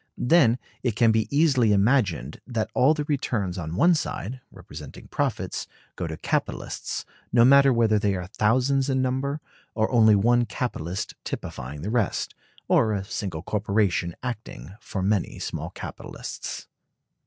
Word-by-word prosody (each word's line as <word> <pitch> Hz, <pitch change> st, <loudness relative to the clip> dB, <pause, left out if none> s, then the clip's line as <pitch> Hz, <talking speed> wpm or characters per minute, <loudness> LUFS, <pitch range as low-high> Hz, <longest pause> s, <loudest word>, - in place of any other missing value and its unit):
Then 125 Hz, -5 st, +4 dB, 0.2 s
it 120 Hz, -5 st, -1 dB
can 115 Hz, -1 st, +4 dB
be 110 Hz, -1 st, +1 dB
easily 140 Hz, -7 st, +3 dB
imagined 100 Hz, -, +1 dB
that 110 Hz, -3 st, -2 dB
all 145 Hz, +5 st, +4 dB
the 150 Hz, -, -2 dB
returns 110 Hz, -, -1 dB
on 80 Hz, 0 st, -4 dB
one 175 Hz, -, +5 dB
side, 130 Hz, -, -3 dB
representing -, -, -11 dB
profits, -, -, -2 dB, 0.3 s
go 90 Hz, -, -3 dB
to 80 Hz, -1 st, -5 dB
capitalists, -, -, -3 dB, 0.3 s
no 120 Hz, -1 st, +6 dB
matter 140 Hz, +1 st, +7 dB
whether 115 Hz, -3 st, +3 dB
they 100 Hz, -1 st, +1 dB
are 90 Hz, -1 st, -4 dB
thousands 130 Hz, +7 st, +1 dB
in 130 Hz, -1 st, +1 dB
number, 135 Hz, +3 st, -1 dB, 0.3 s
or 110 Hz, -1 st, +1 dB
only 110 Hz, -3 st, +6 dB
one 120 Hz, +4 st, +3 dB
capitalist 95 Hz, -, -3 dB
typifying 70 Hz, +4 st, -6 dB
the 105 Hz, -, -2 dB
rest, 115 Hz, -5 st, 0 dB, 0.3 s
or 110 Hz, -1 st, +3 dB
a 100 Hz, -2 st, -2 dB
single 90 Hz, -6 st, -4 dB
corporation 100 Hz, -4 st, 0 dB
acting 110 Hz, -, -6 dB
for 105 Hz, -3 st, -4 dB
many 100 Hz, -1 st, 0 dB
small -, -, -4 dB
capitalists. -, -, -7 dB
110 Hz, 145 wpm, -25 LUFS, 100-130 Hz, 0.3 s, matter